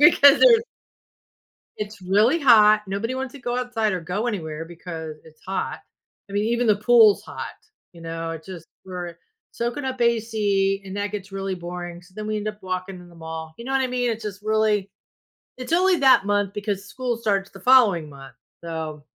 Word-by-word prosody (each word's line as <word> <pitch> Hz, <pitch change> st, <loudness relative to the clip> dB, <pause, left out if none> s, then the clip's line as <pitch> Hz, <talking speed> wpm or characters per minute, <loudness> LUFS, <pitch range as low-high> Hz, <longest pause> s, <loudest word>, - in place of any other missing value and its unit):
because 290 Hz, -2 st, +7 dB
it 465 Hz, -2 st, +7 dB, 1.1 s
It's 210 Hz, -1 st, -6 dB
really 210 Hz, -, +3 dB
hot, 215 Hz, -6 st, +6 dB
nobody 200 Hz, +6 st, -2 dB
wants 260 Hz, 0 st, -4 dB
to 285 Hz, -, -10 dB
go 240 Hz, -1 st, -3 dB
outside 235 Hz, -4 st, -1 dB
or 180 Hz, -, -3 dB
go 185 Hz, +7 st, -3 dB
anywhere 165 Hz, -7 st, -4 dB
because 165 Hz, -2 st, -8 dB
it's 155 Hz, -1 st, -19 dB
hot, 190 Hz, +1 st, -3 dB, 0.5 s
I -, -, -10 dB
mean, 205 Hz, +1 st, +1 dB
even 235 Hz, +2 st, +1 dB
the 210 Hz, -, +5 dB
pool's 215 Hz, -1 st, +5 dB
hot, -, -, -7 dB, 0.4 s
you 170 Hz, -, -14 dB
know, 165 Hz, 0 st, -5 dB
it 165 Hz, -1 st, -7 dB
just 175 Hz, -3 st, -9 dB, 0.2 s
we're 180 Hz, -2 st, -6 dB, 0.4 s
soaking 240 Hz, +4 st, -3 dB
up 260 Hz, -1 st, -3 dB
AC, 210 Hz, -4 st, +1 dB
and 190 Hz, +1 st, -6 dB
that 205 Hz, 0 st, -2 dB
gets 200 Hz, -1 st, -6 dB
really 195 Hz, -1 st, -3 dB
boring, 175 Hz, 0 st, -7 dB
so 180 Hz, +1 st, -21 dB
then 215 Hz, -, -5 dB
we 215 Hz, 0 st, -1 dB
end 210 Hz, 0 st, -4 dB
up 210 Hz, -1 st, -5 dB
walking 185 Hz, +1 st, -4 dB
in 175 Hz, 0 st, -14 dB
the 170 Hz, -, -17 dB
mall, 160 Hz, -1 st, -7 dB
you 235 Hz, -, -9 dB
know 265 Hz, -, -4 dB
what 270 Hz, -, +3 dB
I 260 Hz, -, 0 dB
mean, 250 Hz, -1 st, -1 dB
it's 225 Hz, -1 st, -3 dB
just 205 Hz, -1 st, -6 dB
really 215 Hz, -2 st, +1 dB, 0.7 s
it's 255 Hz, +5 st, -6 dB
only 365 Hz, +2 st, +4 dB
that 265 Hz, -7 st, +5 dB
month 205 Hz, -1 st, 0 dB
because 205 Hz, -1 st, -3 dB
school 250 Hz, -1 st, -3 dB
starts 200 Hz, -4 st, -1 dB
the 195 Hz, -, -13 dB
following 205 Hz, -9 st, +5 dB
month, 135 Hz, -1 st, -12 dB, 0.3 s
so 160 Hz, -3 st, -5 dB
205 Hz, 195 wpm, -23 LUFS, 180-235 Hz, 1.1 s, because